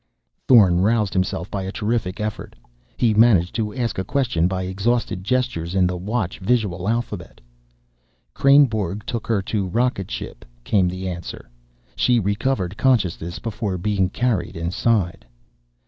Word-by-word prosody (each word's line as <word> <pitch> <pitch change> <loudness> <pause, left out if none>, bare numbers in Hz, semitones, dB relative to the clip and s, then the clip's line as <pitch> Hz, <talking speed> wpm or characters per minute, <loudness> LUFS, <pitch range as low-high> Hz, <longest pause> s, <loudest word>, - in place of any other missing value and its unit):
Thorn 95 -8 +6
roused 105 -1 +2
himself 95 0 -1
by 100 - -2
a 95 0 -4
terrific 105 -3 -2
effort. 105 0 -5 0.4
He 115 -3 +3
managed 105 -6 +4
to 110 -2 -2
ask 120 -6 -2
a - - -1
question 110 -10 0
by 95 0 -2
exhausted 95 +1 -1
gestures 100 -7 -1
in 95 -1 +4
the 90 0 -1
Watch 95 +1 -3
visual 100 -3 0
alphabet. 120 +1 -3 0.9
"Kreynborg 110 -9 +3
took 115 -3 -4
her 105 -4 +1
to 100 -1 -2
rocket 115 -1 0
ship," - - -6 0.2
came 95 - +2
the 95 +1 -4
answer. 85 -8 -7 0.4
"She 125 -1 +3
recovered 100 -1 -1
consciousness 90 -10 +1
before 110 -4 -3
being 95 0 0
carried 115 -6 -1
inside." 90 +2 0
100 Hz, 140 wpm, -22 LUFS, 90-115 Hz, 0.9 s, Thorn